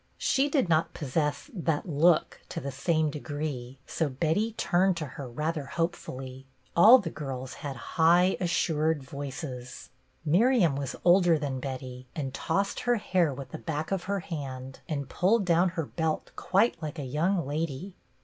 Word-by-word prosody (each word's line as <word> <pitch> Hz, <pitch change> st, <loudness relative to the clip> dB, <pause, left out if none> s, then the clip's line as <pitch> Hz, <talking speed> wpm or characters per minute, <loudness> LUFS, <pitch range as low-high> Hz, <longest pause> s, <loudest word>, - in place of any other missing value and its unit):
She 275 Hz, +2 st, +2 dB
did 275 Hz, -, +2 dB
not 160 Hz, -1 st, +1 dB
posse.ss 150 Hz, -, -2 dB
" -, -, -25 dB
that 160 Hz, +2 st, +1 dB
look 160 Hz, +1 st, +3 dB
" -, -, -32 dB
to -, -, -4 dB
the 140 Hz, +1 st, -4 dB
same 155 Hz, +3 st, +1 dB
degree, 145 Hz, -4 st, -5 dB
so 160 Hz, -3 st, -1 dB
Betty 165 Hz, -, 0 dB
turned 185 Hz, -3 st, +2 dB
to 155 Hz, -, -3 dB
her 130 Hz, -1 st, -8 dB
rather 150 Hz, +4 st, -2 dB
hopefully. 135 Hz, -4 st, -4 dB, 0.3 s
All 220 Hz, +9 st, +9 dB
the 190 Hz, -10 st, -4 dB
girls 135 Hz, -3 st, -5 dB
had 140 Hz, -2 st, -4 dB
high, 170 Hz, +7 st, +3 dB
assured 160 Hz, -4 st, +1 dB
voices. 135 Hz, -2 st, -7 dB, 0.3 s
Miriam 180 Hz, -, +4 dB
was 140 Hz, -2 st, -3 dB
older 175 Hz, -2 st, +6 dB
than 140 Hz, -3 st, -3 dB
Betty, 130 Hz, -1 st, -6 dB
and 135 Hz, -4 st, -3 dB
tossed 195 Hz, +8 st, -1 dB
her 245 Hz, 0 st, +2 dB
hair 185 Hz, -7 st, +1 dB
with 135 Hz, 0 st, -7 dB
the 160 Hz, -, -6 dB
back 155 Hz, 0 st, -3 dB
of 195 Hz, -2 st, -1 dB
her 200 Hz, 0 st, -1 dB
hand, 135 Hz, -5 st, -6 dB
and 140 Hz, -4 st, -2 dB
pulled 200 Hz, +7 st, +2 dB
down 175 Hz, +1 st, +4 dB
her 165 Hz, -, 0 dB
belt 160 Hz, +1 st, -2 dB
quite 195 Hz, -2 st, +2 dB
like 155 Hz, +1 st, -5 dB
a 145 Hz, -, -4 dB
young 160 Hz, +7 st, 0 dB
lady. 155 Hz, +5 st, -3 dB
155 Hz, 170 wpm, -28 LUFS, 140-175 Hz, 0.3 s, All